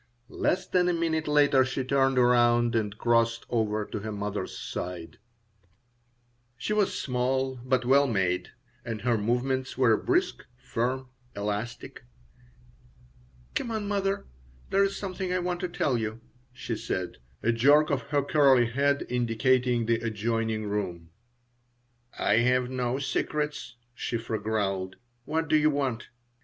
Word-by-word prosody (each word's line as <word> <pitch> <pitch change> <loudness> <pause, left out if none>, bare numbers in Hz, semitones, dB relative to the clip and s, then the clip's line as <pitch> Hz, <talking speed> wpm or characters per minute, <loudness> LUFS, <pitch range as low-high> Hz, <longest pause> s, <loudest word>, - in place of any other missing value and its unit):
Less 185 +1 0
than 180 -1 +2
a - - +2
minute 160 -2 -1
later 145 -3 +4
she 130 0 -2
turned 135 0 +2
around 120 -1 +4
and 105 -2 -1
crossed 115 0 +2
over 110 -2 0
to - - -5
her 110 +2 -5
mother's 105 -2 -4
side 90 -2 -6 1.4
She 165 +13 -2
was 210 -2 +1
small, 130 +1 -1
but 130 -1 +1
well 140 +3 +5
made, 95 -6 0 0.3
and 115 -3 -5
her 120 -1 +2
movements 125 +5 -1
were 120 -4 +5
brisk, - - 0
firm, 125 +1 -2 0.3
elastic 105 +4 -4 1.5
"Come 235 - -2
on, 220 -2 -3
mother, 195 -1 -1 0.5
there's 195 0 +2
something 190 -2 -4
I 180 - +1
want 180 0 -2
to 180 - -3
tell 135 -7 0
you," 110 0 -4 0.3
she 125 -2 -5
said, 95 -3 -4 0.3
a 115 - +3
jerk 145 +7 +4
of 140 -3 +1
her 145 -1 +1
curly 135 -4 +4
head 140 +2 +1
indicating 125 0 +1
the 115 0 +1
adjoining 110 -1 -1
room 90 -5 -4 1.1
"I - - +2
have 125 +1 +2
no 125 0 -1
secrets," 150 -1 -2 0.2
Shiphrah 115 -3 -3
growled. 100 -3 -1 0.3
"What 160 +1 -1
do 155 - +3
you 155 0 +4
want?" 135 -5 -2
125 Hz, 135 wpm, -27 LUFS, 110-140 Hz, 1.5 s, well